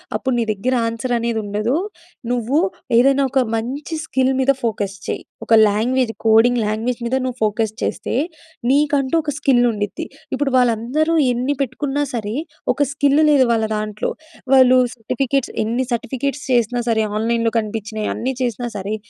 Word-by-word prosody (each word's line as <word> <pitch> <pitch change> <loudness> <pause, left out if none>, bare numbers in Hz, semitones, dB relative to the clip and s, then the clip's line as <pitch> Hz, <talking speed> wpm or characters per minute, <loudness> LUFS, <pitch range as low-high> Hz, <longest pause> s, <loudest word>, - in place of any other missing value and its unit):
అప్పుడు 260 - -1
నీ - - +2
దగ్గర 215 +5 -1 0.2
ఆన్సర్ 230 +2 -3
అనేది 230 -1 -1
ఉండదు. 210 +5 -1 0.6
నువ్వు 245 +4 +1 0.4
ఏదైనా 275 +3 +4
ఒక 265 - +3
మంచి 270 +8 -4
స్కిల్ 265 -3 +1
మీద 265 +1 +4
ఫోకస్ 205 -4 -2
చెయ్యి. - - -3 0.2
ఒక - - +1 0.2
లాంగ్వేజ్ 230 +3 0
కోడింగ్ 225 +2 +5
లాంగ్వేజ్ 225 +3 -2
మీద 255 - 0
నువ్వు 255 -1 -4
ఫోకస్ 215 0 0
చేస్తే, - - -2 0.6
నీకంటూ 280 -1 +2
ఒక 295 - -2
స్కిల్ 260 -5 +3
ఉండిద్ది. 205 -2 -4 0.3
ఇప్పుడు 275 0 -1
వాళ్ళందరూ 250 +7 +1 0.2
ఎన్ని 255 +4 -1
పెట్టుకున్నా 280 +3 -2
సరే, 220 -2 -3 0.4
ఒక - - -4
స్కిల్ 285 0 +3
లేదు 265 -3 +5
వాళ్ళ 220 -1 +1
దాంట్లో. 210 0 -3 0.4
వాళ్ళు 255 -1 +6 0.2
సర్టిఫికేట్స్ 265 +3 -1
ఎన్ని 240 +4 -1
సర్టిఫికేట్స్ 265 +5 -3
చేసినా 240 +1 +1
సరే, 220 - +2
ఆన్‌లైన్‌లో 230 +1 0
కనిపించినయి 215 0 -4
అన్నీ 260 +3 -2
చేసినా 240 0 -2
సరే, 200 +2 -3
245 Hz, 150 wpm, -20 LUFS, 220-265 Hz, 0.6 s, వాళ్ళు